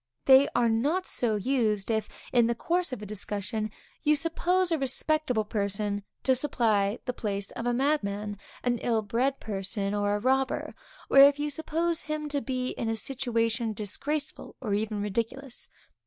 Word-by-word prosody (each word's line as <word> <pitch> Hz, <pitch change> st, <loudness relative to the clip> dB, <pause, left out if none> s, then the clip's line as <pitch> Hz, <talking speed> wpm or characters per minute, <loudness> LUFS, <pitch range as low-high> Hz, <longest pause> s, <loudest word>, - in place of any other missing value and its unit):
They 270 Hz, +1 st, +8 dB
are 240 Hz, -1 st, +4 dB
not 285 Hz, +12 st, +1 dB
so 230 Hz, -3 st, +1 dB
used, 215 Hz, -2 st, 0 dB
if, 220 Hz, -1 st, -1 dB, 0.2 s
in 240 Hz, -2 st, +5 dB
the 235 Hz, -, 0 dB
course 350 Hz, +6 st, 0 dB
of 235 Hz, -5 st, -5 dB
a -, -, -5 dB
discussion, 210 Hz, +1 st, -3 dB, 0.3 s
you 300 Hz, 0 st, +4 dB
suppose 345 Hz, +3 st, +1 dB
a 325 Hz, -, +2 dB
respectable 270 Hz, -3 st, 0 dB
person 205 Hz, -1 st, -1 dB, 0.2 s
to 265 Hz, -, +4 dB
supply 225 Hz, -6 st, +1 dB
the 250 Hz, -, -1 dB
place 200 Hz, -3 st, -1 dB
of 235 Hz, -, -4 dB
a 245 Hz, -, +2 dB
madman, 210 Hz, -7 st, 0 dB, 0.2 s
an 240 Hz, -1 st, +1 dB
ill 225 Hz, -2 st, +1 dB
bred 250 Hz, +6 st, 0 dB
person, 200 Hz, 0 st, -3 dB
or 205 Hz, 0 st, +1 dB
a -, -, -1 dB
robber; 265 Hz, +3 st, 0 dB, 0.3 s
or, 275 Hz, -, +5 dB
if 280 Hz, +1 st, +8 dB
you 295 Hz, 0 st, -2 dB
suppose 325 Hz, +2 st, -1 dB
him 305 Hz, -1 st, -4 dB
to 285 Hz, -1 st, -1 dB
be 255 Hz, -1 st, -2 dB
in 230 Hz, -, -3 dB
a 225 Hz, -, 0 dB
situation 230 Hz, -2 st, -1 dB
disgraceful 280 Hz, +9 st, -2 dB
or 215 Hz, -6 st, -2 dB
even 210 Hz, 0 st, -1 dB
ridiculous. 230 Hz, +5 st, -3 dB
240 Hz, 170 wpm, -28 LUFS, 210-280 Hz, 0.3 s, They